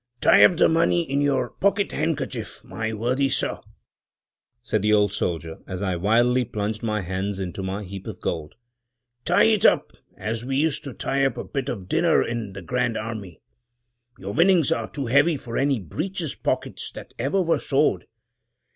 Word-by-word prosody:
"Tie - - +6
up 175 - +6
the - - +5
money 170 +1 +2
in 140 +1 0
your 135 -4 +1
pocket 200 +1 +1
handkerchief, 155 0 -3
my 110 0 -4
worthy 125 +5 0
sir," - - 0 1.0
said 110 - 0
the 105 +1 +2
old 105 -2 +3
soldier, 80 -3 -3
as 95 +1 -4
I 95 -2 0
wildly 120 +7 +3
plunged 110 -2 -3
my 105 -2 -1
hands 95 +2 -3
into 95 0 -4
my 95 +2 -3
heap 95 0 -8
of - - -7
gold. 80 -3 -4 0.7
"Tie 175 - +4
it 220 -3 +3
up, - - +4 0.2
as 110 +3 -3
we 135 +1 -2
used 155 0 +1
to 140 - -6
tie 135 0 0
up 135 - +1
a - - -3
bit 135 -1 -4
of 100 -8 -5
dinner 165 - +3
in 115 -4 -4
the 95 -1 -8
Grand 125 +3 -1
Army; 110 -6 -6 0.8
your 100 +2 -6
winnings 170 - +4
are 115 -1 -1
too 140 -2 -4
heavy 140 +6 +3
for 115 -3 -8
any 135 -2 +2
breeches 160 - -4
pockets - - -3
that - - -10
ever 140 +11 +1
were 170 -3 +2
sewed. - - +1
120 Hz, 180 wpm, -24 LUFS, 100-145 Hz, 1.0 s, Tie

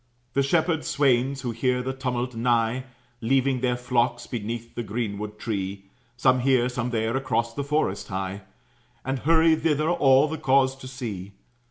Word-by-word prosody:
The 140 - +3
shepherd 160 +2 +1
swains, 135 -4 +1
who 125 -3 -2
hear 125 +2 0
the 130 +1 -2
tumult 125 -1 -2
nigh, 120 +1 +1 0.4
Leaving 130 +2 +2
their 125 -1 +1
flocks 120 -1 0
beneath 115 0 -5
the - - -3
greenwood 105 -2 -4
tree, 100 -3 -4 0.3
Some 130 0 +4
here, 125 -1 +3
some 125 -1 -2
there, 115 0 -1
across 115 -3 0
the 140 - -3
forest 140 -9 -1
hie, 95 +1 -4 0.6
And 135 0 -1
hurry 160 +2 +4
thither, 155 0 +1
all, 135 -3 +5
the 160 0 -4
cause 135 0 +3
to 130 - -10
see. 105 -7 -6
125 Hz, 160 wpm, -25 LUFS, 115-135 Hz, 0.6 s, all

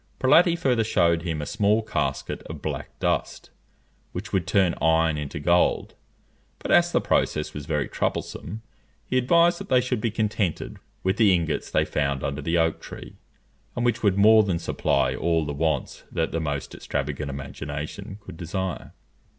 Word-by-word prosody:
Prelati 170 +6 +5
further 125 -8 +2
shewed 85 -6 +2
him 80 -3 -3
a - - -4
small 105 +7 +2
casket 75 -9 -2
of - - -7
black - - -5
dust, - - -2 0.6
which 105 +4 -6
would 90 -3 0
turn 95 -4 +3
iron 80 -1 +3
into 75 -1 -5
gold; 85 +4 +2 0.6
but - - -5
as - - +5
the - - +3
process 75 0 0
was 75 -1 -7
very 75 -4 0
troublesome, 110 +1 -3 0.4
he 125 - -3
advised 170 +7 +4
that - - -8
they 130 - +5
should 125 -2 -1
be 115 - +1
contented 105 -5 -2 0.3
with 95 +3 +1
the 110 -4 +5
ingots 85 -4 0
they - - +2
found 70 -2 -1
under 70 +1 -2
the 80 +4 0
oak 80 -1 +1
tree, - - -10 0.6
and 120 - -1
which 115 -1 +1
would 100 -3 +2
more 110 +2 +7
than 95 -5 0
supply - - 0
all 85 -2 0
the 75 - -3
wants 80 +1 -1
that 80 -1 -1
the 85 - -1
most 75 -3 -3
extravagant 70 +1 -3
imagination 70 +8 -6
could 80 - -10
desire. 90 +2 -4
85 Hz, 170 wpm, -25 LUFS, 75-110 Hz, 0.6 s, more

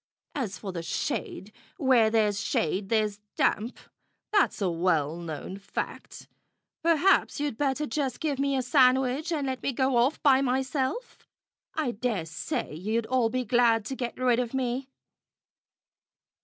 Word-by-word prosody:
As 220 -10 -3
for 195 - -6
the 170 -2 -4
shade, 165 +4 -3 0.3
where 250 -5 +4
there's 210 -2 +2
shade 190 +5 -1
there's 215 -2 +1 0.2
damp. 225 +4 +1 0.5
That's 410 -10 +2
a 195 - +1
well 165 -3 +1
known 170 +3 -6
fact. 200 - -6 0.5
Perhaps 335 +2 +3
you'd 290 -5 -1
better 285 +3 0
just 270 -2 -2
give 290 -4 -1
me 275 -1 +1
a 260 - 0
sandwich 260 +4 +3
and 300 -4 -1
let 260 -1 -3
me - - 0
go 260 0 +1
off 250 +6 +2
by 270 -2 +5
myself. 265 - -2 0.5
I 305 -6 0
dare 220 -6 -2
say 160 -1 -4
you'll 215 +8 -1
all 250 -3 +2
be 255 +2 -2
glad 230 -1 +3
to 265 - -4
get 245 -2 -4
rid 250 -2 +2
of 245 +1 -2
me." 260 +1 -2
250 Hz, 150 wpm, -27 LUFS, 210-270 Hz, 0.5 s, by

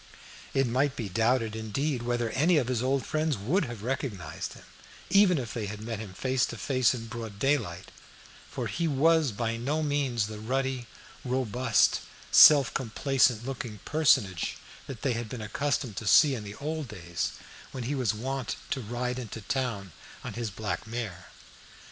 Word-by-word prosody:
It 135 0 +4
might 130 +3 +1
be 110 -5 -4
doubted, 115 +2 +1
indeed, 125 +5 -2
whether 120 -1 -1
any 160 +5 +3
of 130 -4 +1
his 125 -3 0
old 135 +1 0
friends 155 -3 0
would 150 - +1
have 120 -4 -7
recognised 110 - -4
him, - - -14 0.5
even 195 -3 +6
if 120 -3 -4
they 110 -4 -3
had 105 +1 -6
met 110 0 -5
him 100 -4 -8
face 130 +2 0
to 120 - -7
face 130 +1 +2
in 115 -2 -6
broad 115 -2 -7
daylight, 105 -8 -1 0.6
for - - -4
he 170 0 -1
was 155 0 +3
by 115 +2 -2
no 145 +7 -1
means 140 -7 0
the 105 0 -7
ruddy, 130 +1 -2 0.4
robust, 125 -2 +2 0.3
self 140 -5 +8
complacent 125 -1 +1
looking 125 -5 -5
personage 110 - +2 0.3
they 130 0 -2
had 115 -1 -4
been 125 - -6
accustomed 125 0 -2
to 110 - -4
see 145 +6 +7
in 115 -5 -4
the 100 0 -8
old 155 +1 -4
days 85 -6 -4 0.4
when 130 - -5
he 130 +5 -2
was 130 -7 +1
wont 130 +3 -3 0.2
to 135 - -1
ride 125 +3 -3
into 115 -2 -7
town 110 -5 -2 0.3
on - - -5
his 115 -2 -3
black 105 +1 -4
mare. 110 -8 -5
120 Hz, 170 wpm, -28 LUFS, 110-135 Hz, 0.6 s, self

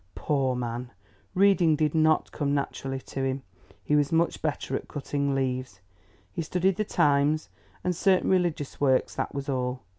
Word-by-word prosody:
Poor 135 -3 0
man, 120 0 -4 0.5
reading 185 -4 +5
did 150 -1 +1
not 155 -1 +3
come 145 -1 -1
naturally 135 -1 -3
to 135 0 -5
him; 135 0 -1 0.4
he 150 - +1
was 145 +1 +2
much 165 +1 +1
better 145 -3 -2
at - - -4
cutting 140 -1 -2
leaves. 130 -6 -2 0.5
He 165 - -3
studied 180 +3 +1
the 215 - +1
Times 145 -2 +2 0.3
and 180 -1 0
certain 190 +2 +3
religious 175 -7 0
works, 130 -2 +3
that - - -3
was 140 0 -4
all. 125 -2 -2
145 Hz, 160 wpm, -27 LUFS, 135-160 Hz, 0.5 s, reading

